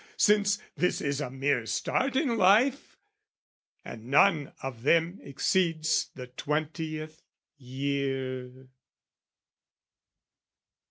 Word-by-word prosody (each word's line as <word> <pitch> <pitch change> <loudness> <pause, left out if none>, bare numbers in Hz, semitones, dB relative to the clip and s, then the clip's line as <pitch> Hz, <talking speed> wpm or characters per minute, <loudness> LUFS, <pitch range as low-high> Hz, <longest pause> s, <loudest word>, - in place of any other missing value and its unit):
Since 205 -1 +3 0.2
this 180 - 0
is 140 0 -2
a 145 - -3
mere 135 -2 -1
start 260 - -1
in 265 -4 +1
life, 225 +8 +3 0.9
And 110 -1 -9
none 145 +1 +3
of 130 -4 -6
them 165 +7 +2
exceeds 160 +2 0
the 125 - -7
twentieth 155 +3 -4 0.4
year. 130 -1 -4
150 Hz, 90 wpm, -28 LUFS, 130-180 Hz, 0.9 s, Since